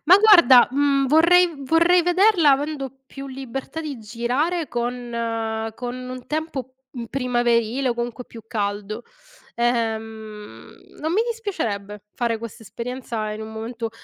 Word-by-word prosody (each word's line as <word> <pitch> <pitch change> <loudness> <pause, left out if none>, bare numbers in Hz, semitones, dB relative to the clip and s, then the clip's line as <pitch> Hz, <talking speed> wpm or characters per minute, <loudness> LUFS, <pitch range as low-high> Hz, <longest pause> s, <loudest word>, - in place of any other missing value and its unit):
ma 360 +5 +8
guarda, 345 - +7
mhmm, 275 0 +2
vorrei 340 +4 +5
vorrei 340 +5 +4
vederla 355 -2 +4
avendo 275 -1 -2 0.2
più 275 0 -9
libertà 270 +3 -6
di 290 -6 -5
girare 250 +10 -1
con 230 -2 -3
con 245 +1 -5
un 255 0 -8
tempo, 300 -5 -4 0.2
mhmm, 240 -3 -6
primaverile 240 0 0
o 240 - 0
comunque 240 +1 -4
più 225 -2 -12
caldo. 210 +1 -3 0.5
Ehm, 220 -3 -3 0.3
non 315 +2 -1
mi 430 +5 +3
dispiacerebbe 215 - -4
fare 235 -2 -1
questa 230 0 -9
esperienza 235 -1 -5
in 215 +1 -6
un 220 - -8
momento 225 +1 -5
245 Hz, 135 wpm, -22 LUFS, 225-300 Hz, 0.5 s, ma